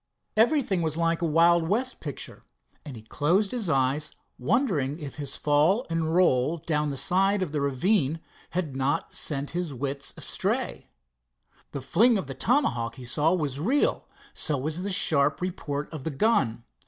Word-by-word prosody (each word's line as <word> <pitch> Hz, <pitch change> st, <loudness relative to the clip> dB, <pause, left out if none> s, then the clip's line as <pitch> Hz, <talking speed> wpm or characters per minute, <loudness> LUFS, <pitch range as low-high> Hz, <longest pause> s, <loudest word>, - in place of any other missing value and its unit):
Everything 225 Hz, -, +2 dB
was 160 Hz, -1 st, -1 dB
like 165 Hz, 0 st, 0 dB
a 170 Hz, -, +1 dB
Wild 165 Hz, +1 st, +4 dB
West 250 Hz, +5 st, 0 dB
picture, 145 Hz, -3 st, -6 dB, 0.4 s
and 140 Hz, -, -8 dB
he 110 Hz, -, -11 dB
closed 175 Hz, -, +1 dB
his 230 Hz, -8 st, -3 dB
eyes 140 Hz, +2 st, +1 dB, 0.3 s
wondering 150 Hz, -, 0 dB
if 150 Hz, -3 st, -8 dB
his 140 Hz, -2 st, -5 dB
fall 155 Hz, -, +2 dB
and 165 Hz, 0 st, -1 dB
roll 160 Hz, -3 st, +3 dB
down 150 Hz, -2 st, -1 dB
the 140 Hz, -, -4 dB
side 195 Hz, +3 st, +2 dB
of 165 Hz, -, -5 dB
the 150 Hz, -2 st, -2 dB
ravine 140 Hz, +3 st, +1 dB, 0.3 s
had 165 Hz, -6 st, -3 dB
not 135 Hz, +2 st, -1 dB
sent 140 Hz, -1 st, -1 dB
his 170 Hz, -5 st, -3 dB
wits 140 Hz, +2 st, -2 dB
astray. -, -, -2 dB, 0.8 s
The 140 Hz, -, -6 dB
fling 230 Hz, -, +4 dB
of 190 Hz, -, -3 dB
the 135 Hz, -, -6 dB
tomahawk 125 Hz, -, 0 dB
he 125 Hz, -, -10 dB
saw 150 Hz, +6 st, +2 dB
was 145 Hz, -5 st, -3 dB
real, 255 Hz, -, +1 dB, 0.3 s
so 150 Hz, -3 st, -1 dB
was 155 Hz, +6 st, -3 dB
the 200 Hz, +2 st, -3 dB
sharp 150 Hz, -6 st, +3 dB
report 150 Hz, -5 st, -4 dB
of 150 Hz, -4 st, -6 dB
the -, -, -2 dB
gun. 135 Hz, -, +1 dB
155 Hz, 165 wpm, -26 LUFS, 140-185 Hz, 0.8 s, Wild